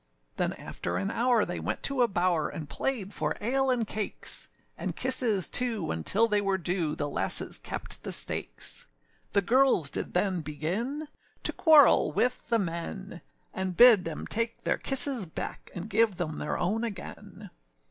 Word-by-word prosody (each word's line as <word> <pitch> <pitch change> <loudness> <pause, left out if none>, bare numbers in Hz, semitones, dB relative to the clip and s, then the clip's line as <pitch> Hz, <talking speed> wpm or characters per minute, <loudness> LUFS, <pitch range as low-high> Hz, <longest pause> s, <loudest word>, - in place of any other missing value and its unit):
Then - - -1
after 85 +1 -5
an 95 +1 -2
hour, 240 -2 +2
they 175 - -5
went - - -4
to 275 -2 0
a 240 - +4
bower, 175 -5 0
And 155 - -7
played 210 - -2
for - - -2
ale 265 +5 0
and 245 -3 +1
cakes; 215 0 -2 0.3
And - - -5
kisses, 245 -7 +2
too; 235 -6 -1
âuntil 160 - +1
they 210 -2 +1
were 195 -1 0
due, 175 -3 -2
The 145 - -3
lasses - - +1
kept - - -4
the - - -6
stakes: - - +1 0.5
The 200 - +2
girls 240 - +3
did - - -6
then 185 -1 0
begin 195 - -4 0.4
To - - 0
quarrel 310 -5 +5
with 250 -2 -1
the 230 - +3
men; 165 - -5 0.3
And 185 -1 -4
bid 235 -6 +7
âem 165 -2 -6
take 230 +1 -3
their - - -1
kisses 270 -6 +4
back, 160 - -7
And 180 +3 -6
give 220 -1 +2
them 165 -4 -4
their 150 - -3
own 210 +6 -1
again. 205 -6 -8
205 Hz, 170 wpm, -28 LUFS, 175-240 Hz, 0.5 s, bid